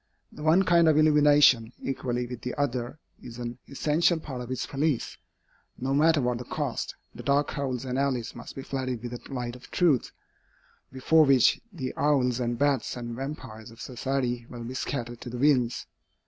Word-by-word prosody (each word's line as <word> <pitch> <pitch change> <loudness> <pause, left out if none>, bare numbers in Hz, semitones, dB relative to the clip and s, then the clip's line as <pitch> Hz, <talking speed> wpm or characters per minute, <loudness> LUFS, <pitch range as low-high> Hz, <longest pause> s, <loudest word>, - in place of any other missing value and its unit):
The - - -11
one 160 +5 +4
kind 170 -3 +5
of 155 - +4
illumination, 145 -6 +5
equally 125 -2 -2
with 120 -1 -7
the 125 - -4
other, 130 -2 -2 0.2
is 115 -1 -10
an 120 0 -6
essential 160 +4 +2
part 130 -5 -6
of 120 - -7
its 130 - -2
police. 145 -2 -1 0.6
No 135 +2 -2
matter 155 +2 +4
what 120 -1 0
the - - -5
cost, - - -3 0.2
the - - -9
dark 140 +1 +1
holes 135 -3 -3
and 130 +1 -2
alleys 130 -4 -1
must - - -9
be 135 - -6
flooded 130 -4 -3
with 120 - -5
the 120 +3 -9
light 125 -2 -4
of 125 - -14
truth, 160 -9 +2 0.8
before 155 +5 +4
which 135 -4 +4
the 130 -9 -5
owls 130 -4 +2
and 120 -1 -1
bats 140 -2 +1
and 120 -1 -5
vampyres 130 -5 -7
of 115 +1 -15
society 125 0 -2
will 120 -1 -8
be 120 +2 -6
scattered 120 -3 -4
to 125 - -7
the 125 - -6
winds. 125 -3 +2
130 Hz, 185 wpm, -27 LUFS, 120-145 Hz, 0.8 s, kind